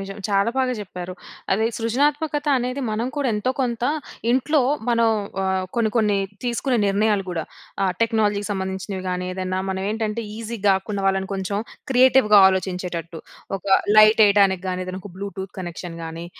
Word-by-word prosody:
నిజం. 195 0 -7
చాలా 200 +2 +2
బాగా 260 -1 +1
జెప్పారు. 185 -3 -7 0.4
అదే 215 +3 +2
సృజనాత్మకత 290 +6 0
అనేది 250 +3 -3
మనం 220 +3 -1
కూడా 285 -2 0
ఎంతో 210 +5 0
కొంతా, 240 0 0 0.4
ఇంట్లో 270 +4 +2 0.3
మనం 230 -1 +3 0.3
ఆహ్, 190 0 0
కొన్ని, 225 -2 +2
కొన్ని 210 -3 +2 0.3
తీసుకునే 245 +2 0
నిర్ణయాలు 205 0 +1
గూడా. 165 -3 -3 0.4
ఆహ్, 190 - +2
టెక్నాలజీకి 215 -3 +1
సంబంధించినవి 190 0 -4
గానీ 180 0 -2
ఏదన్నా, 185 0 -3
మనవేంటంటే, 210 +4 -2
ఈజీగ 225 -2 -6
గాకుండా, 195 +1 0
వాళ్ళను 190 0 +1
కొంచుం 195 +1 -2 0.3
క్రియేటివ్‌గా 255 -4 +6
ఆలోచించేటట్టు. 180 -3 -3 0.4
ఒక - - -17 0.3
లైటెయ్యడానికి 205 -3 +6
గానీ, 185 0 -2
ఏదన్నొక 185 +1 -7
బ్లూటూత్ 195 0 -6
కనెక్షన్ 175 -1 -6
గానీ, 165 +1 -7
205 Hz, 140 wpm, -22 LUFS, 190-230 Hz, 0.4 s, క్రియేటివ్‌గా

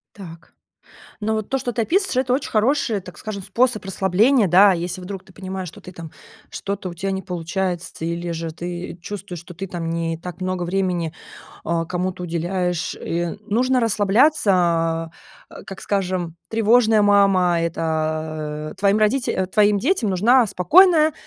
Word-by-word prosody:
Так. 170 -4 -12 0.7
Но 220 +1 0
вот 215 -1 -4
то, 270 - +1
что 250 -2 -3
ты 230 - 0
описываешь, 380 - 0
это 250 - -3
очень 265 - -1
хороший, 225 -1 +1
так 180 -1 -12
скажем, 200 -3 -6
способ 235 +3 +1
расслабления, 195 +5 +2
да. 190 +4 +6
Если 175 +1 -4
вдруг 190 +1 -7
ты 190 - -18
понимаешь, 190 -1 -6
что 200 +5 -11
ты 185 - -11
там 165 -3 -10 0.4
что-то 200 -2 -5
у 175 - -7
тя 195 +3 -3
не 190 - -2
получается, 180 -1 -4
или 170 +1 -3
же 165 0 -4
ты 175 +1 -6
чувствуешь, 185 -3 -7
что 180 +1 -12
ты 195 +3 -6
там 170 -2 -4
не 165 -1 -2
так 175 +1 -9
много 185 -1 -2
времени, 175 -3 -1 0.5
а, 165 0 0
кому-то 180 +1 -3
уделяешь, 175 +1 -2
и 170 +2 -3
нужно 250 +5 +1
расслабляться. 190 - +2 0.6
Как, 195 - -8
скажем, 185 -4 -2
тревожная 225 0 +4
мама, 195 -4 +4
это 155 -2 -3
твоим 200 +1 +3
родите 215 -3 +1
твоим 205 +1 +3
детям 255 - +1
нужна 230 +7 +4
спокойная, 315 - +5
185 Hz, 155 wpm, -21 LUFS, 170-210 Hz, 0.7 s, да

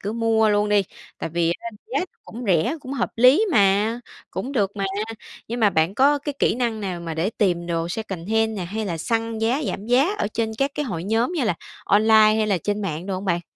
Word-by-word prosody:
cứ 205 - -3
mua 225 -1 +2
luôn 210 0 +2
đi, 205 -1 +4 0.4
tại - - -4
vì 170 +1 +1
á, 230 - -5 0.2
giá - - +2
nó - - -1 0.2
cũng 240 +3 -8
rẻ, 195 - +2
cũng 265 0 -7
hợp 280 - -1
lý 255 - +6
mà, 210 +1 +3 0.3
cũng 270 - -4
được 205 -6 0
mà. 200 - -1 0.6
Nhưng 235 +2 -3
mà 210 -2 +5
bạn 165 +1 +1
có 285 +5 +4
cái 290 +1 -4
kỹ - - +2
năng 235 -3 -1
nào 185 -4 -4
mà 165 -1 -5
để 165 +6 0
tìm 180 -6 0
đồ 165 -1 -1
secondhand 220 +3 -1
nè 180 - -3
hay 215 +5 -4
là 170 -4 -3
săn 225 +4 -1
giá 235 +7 +1
giảm 200 - -4
giá 265 - +3
ở - - 0
trên 220 -1 -1
các 275 +1 +1
cái 295 - -2
hội 175 - -4
nhóm, 225 - +1
như 310 -7 0
là, 215 -6 +1 0.3
online 215 +2 +4 0.2
hay 220 0 +1
là 200 -3 +1
trên 205 +4 -2
mạng 170 -1 -4
đồ 195 - -2
hông 185 +2 -5
bạn? 175 -3 +1
215 Hz, 240 wpm, -23 LUFS, 185-235 Hz, 0.6 s, lý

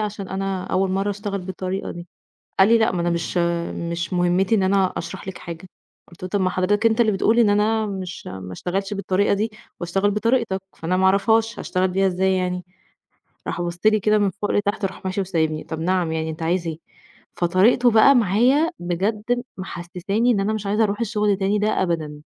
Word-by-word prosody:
عشان 205 -2 -4
أنا 190 -1 -3
أول 190 0 0
مرّه 195 +2 0
أشتغل 200 -1 -4
بالطريقة 185 +1 -4
دي." 175 0 -8 0.5
قال 190 - +7
لي: 230 - +6
"لأ، 220 - +2
ما 180 -2 -2
أنا 175 - 0
مش، 170 +1 -2 0.5
مش 170 +1 -3
مهمّتي 180 +4 +2
إن 195 - +2
أنا 190 -1 +2
أشرح 180 +3 -6
لِك 190 - -6
حاجة." 170 +2 -9 0.4
قُلت 170 +1 -15
له: 185 - -4
"طَب 205 0 0
ما 185 - +2
حضرتك 200 +4 0
أنت 225 +1 +4
اللي 220 - +3
بتقول 220 +4 +2
إن 225 -3 +5
أنا 215 +2 +2
مش 185 -3 -6
ما 95 0 -7
اشتغلش 195 - -3
بالطريقة 200 0 +1
دي 215 +2 -1 0.3
وأشتغل 195 +4 +1
بطريقتك 220 -2 0 0.2
فأنا 180 +3 -1
ما 190 - +2
أعرفهاش 220 +4 +2
هاشتغل 185 0 0
بيها 195 +1 +2
إزاي 190 +1 +1
يعني؟" 180 -1 -2 0.8
راح - - -3
بَصّ 175 0 -4
لي 215 -1 +5
كده 210 +2 +3
من 205 -2 +2
فوق 205 +1 -4
لتحت، 205 0 0
وراح 190 0 -5
ماشي 190 +1 -2
وسايبني، 160 -4 -1
طَب 160 -1 -6
نعم 175 -1 0
يعني 160 0 -2
أنت 160 +1 -7
عايز 170 +1 0
إيه؟ 160 -1 -4 0.6
فطريقته 195 +8 +4
بقى 225 +5 +6
معايا 245 - +3
بجد 210 +7 -1 0.2
محسِّساني 185 +5 -2
إن 200 - +1
أنا 200 +2 0
مش 215 -2 -4
عايزة 210 +3 +1
أرُوح 205 +1 -2
الشغل 210 -2 +1
تاني 195 +2 0
ده 210 -2 +1
أبدًا. 155 -4 -2
190 Hz, 200 wpm, -22 LUFS, 180-210 Hz, 0.8 s, قال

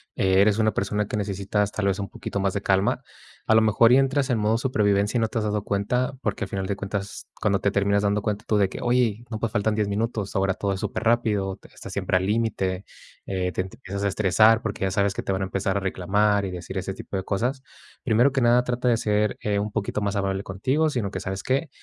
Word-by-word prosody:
eh, 95 0 +3
eres 105 0 +4
una 110 -1 +2
persona 105 +1 -1
que 105 - -3
necesitas, 100 0 -1
tal 100 -2 -1
vez, 100 +1 0
un 100 - -3
poquito 100 - -5
más 95 -1 0
de 100 - -2
calma. 95 0 +1 0.4
A 110 - +5
lo 110 - +6
mejor, 110 +2 +4
y 125 - +7
entras 135 0 +2
en 120 - +2
modo 110 +1 +2
supervivencia 105 -3 +1
y - - +1
no 110 - +2
te 115 - -5
has 110 - -2
dado 105 -1 -1
cuenta, 105 +7 0
porque 105 -2 -2
al - - -10
final 95 -1 -3
de 100 - -1
cuentas, 100 0 -5
cuando 100 -2 +2
te 100 - +1
terminas 100 +1 +2
dando 100 0 +1
cuenta 105 0 -3
tú 105 - +2
de 100 -2 +3
que - - -7
oye, 120 -2 +1
no, 110 - -3
pues, 115 -1 -2
faltan 105 +1 0
10 105 -1 0
minutos. 105 -1 -2
Ahora 95 0 +2
todo 100 +1 -2
es 95 - -4
superrápido, 110 -4 0
o 95 - -4
te - - -18
estás - - -10
siempre 95 - +1
al 95 - -1
límite. 100 -3 -1 0.4
Eh, 90 -1 -2
te 90 - -1
te 95 - -11
empiezas 100 +2 -5
a - - +2
estresar, 110 +3 +4
porque 110 -3 -4
ya 95 - +1
sabes 100 +1 +1
que - - -3
te - - -2
van 95 - -1
a - - 0
empezar 95 +1 -1
a - - +1
reclamar 100 +2 +1
y 95 - -4
decir 90 -2 -6
ese - - -3
tipo 95 - -6
de 95 - -3
cosas. 125 +8 -1 0.4
Primero 120 +3 +3
que 135 - 0
nada, 120 +1 +4
trata 125 0 -2
de 120 - +4
ser, 105 -1 0
eh, 105 -1 0
un 105 +1 -2
poquito 105 0 -2
más 100 0 -1
amable 95 0 -1
contigo, 130 +11 0
sino 120 -8 -2
que, - - -4
¿sabes 95 0 -4
qué?, 135 +4 0
105 Hz, 260 wpm, -24 LUFS, 100-110 Hz, 0.4 s, y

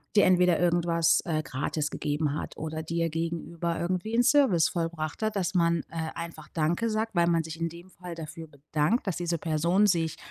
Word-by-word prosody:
dir 205 - +6
entweder 180 -2 +4
irgendwas, 170 -1 +3
äh, 155 -2 -1
gratis 150 +3 -2
gegeben 145 0 -1
hat - - -6
oder 160 0 -4
dir 165 +1 -1
gegenüber 170 +1 -3
irgendwie 185 +5 -2
'n 245 - +4
Service 260 - +4
vollbracht 165 -1 -3
hat, 215 -1 0
dass 195 0 -1
man, 170 -2 +3
äh, 160 -1 -3
einfach 165 -2 -7
„danke“ 170 +8 +1
sagt, 220 +1 -1
weil 170 0 +4
man 165 -1 +2
sich 165 +1 -7
in 165 - 0
dem 170 +3 -12
Fall 175 0 -8
dafür 160 0 -8
bedankt, 150 - -1
dass 190 - -1
diese 170 -1 -1
Person 170 +6 +2
sich 165 -4 +1
170 Hz, 190 wpm, -28 LUFS, 160-180 Hz, -, dir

